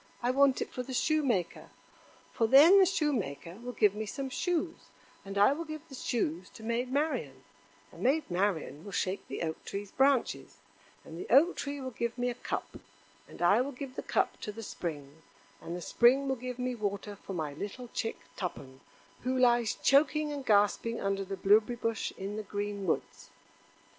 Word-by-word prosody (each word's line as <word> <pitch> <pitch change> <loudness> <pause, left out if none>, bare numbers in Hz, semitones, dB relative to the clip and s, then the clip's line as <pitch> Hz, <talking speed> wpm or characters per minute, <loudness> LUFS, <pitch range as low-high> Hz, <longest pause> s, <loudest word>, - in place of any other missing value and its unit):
I 245 - +3
want 275 0 +4
it - - -13
for 250 - -4
the 255 +1 -6
Shoemaker; 260 - 0 0.6
for 225 - +2
then 305 - +8
the 380 - +6
Shoemaker 205 - -1
will 245 +2 -6
give 210 -4 +3
me 215 +1 -4
some 270 +5 -4
shoes, 335 +3 -2 0.4
and 195 0 -6
I 205 +7 +6
will 325 +3 -4
give 310 0 -8
the - - -12
shoes 185 - -2
to 220 - -11
Maid 235 +3 -1
Marian, 260 - -1 0.5
and 165 - -13
Maid 280 +8 +3
Marian 175 -6 -1
will 200 -1 -9
shake 185 +2 -2
the - - -4
Oak 160 -1 -4
tree's 200 0 -6
branches, 250 - +1 0.5
and 165 - -9
the - - -7
Oak 300 +9 +6
tree 285 0 -4
will 260 -1 -5
give 235 +1 -3
me 245 0 0
a - - -4
cup, 240 - -5 0.5
and - - -7
I 200 +7 +5
will 280 +2 -3
give 255 0 -7
the - - -3
cup - - 0
to 210 - -4
the 225 +2 -8
Spring, 155 -5 -6 0.4
and 170 - -5
the 180 - -6
Spring 255 +8 +4
will 265 - +1
give 250 0 -6
me 250 0 -2
water 205 -2 -3
for 195 - -9
my 155 -5 -3
little 210 - -6
chick 225 -1 -3 0.2
Tuppen, 135 -8 -6 0.4
who 255 +1 -1
lies 240 -3 +3
choking 300 +2 +3
and 285 -2 -5
gasping 215 +1 +2
under 195 0 -1
the 195 0 -5
blueberry 210 +5 +4
bush 230 -1 -2
in 200 +2 -5
the - - -2
green 205 -1 -4
woods." - - -2
230 Hz, 190 wpm, -31 LUFS, 195-265 Hz, 0.6 s, then